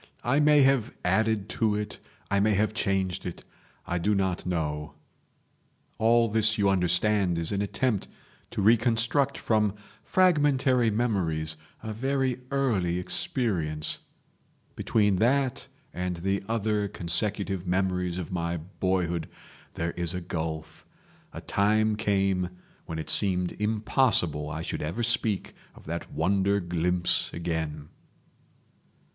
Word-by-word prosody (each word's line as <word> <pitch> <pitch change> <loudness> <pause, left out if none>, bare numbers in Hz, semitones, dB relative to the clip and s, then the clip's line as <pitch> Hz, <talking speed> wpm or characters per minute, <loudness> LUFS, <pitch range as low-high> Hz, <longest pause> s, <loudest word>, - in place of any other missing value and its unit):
I 130 +4 +2
may 150 -1 +6
have 135 -4 +2
added 110 +2 +1
to 110 -2 +3
it, 105 -1 -4 0.3
I 100 - +3
may 105 +1 +3
have 105 +2 +1
changed 95 -5 -1
it; 90 - -7 0.4
I 90 - -1
do 105 +5 +1
not 95 -2 -1
know..... 75 -3 -2 1.0
All 115 +1 +4
this 110 0 +2
you 100 -2 +3
understand 90 0 +2
is 85 -1 -2
an 100 -1 0
attempt 105 +1 -1 0.4
to 100 - -3
reconstruct 120 +5 +3
from 105 -2 +1 0.3
fragmentary 145 -9 +3
memories 90 -9 -1 0.3
a 110 - -4
very 130 +1 -1
early 105 -11 +1
experience. 90 - -2 0.8
Between 105 -4 +2
that 130 +4 +1 0.3
and 90 0 -2
the 95 +3 -1
other 105 -2 0
consecutive 95 +1 -1
memories 90 -1 0
of 90 -4 -5
my 85 -1 -2
boyhood 85 -1 -2 0.5
there 85 +1 -2
is 85 0 -2
a - - -2
gulf. 80 -2 -5 0.5
A - - -8
time 110 +2 +2
came 95 -4 +1 0.4
when 80 - -4
it 80 - -1
seemed 90 -3 +4
impossible 105 - +2
I 80 +2 -4
should - - -4
ever 85 +10 -2
speak 115 -3 0 0.2
of - - -16
that 85 +2 -5
wonder 100 +5 +1
glimpse 90 0 0
again." 80 -3 -3
100 Hz, 125 wpm, -27 LUFS, 85-110 Hz, 1.0 s, may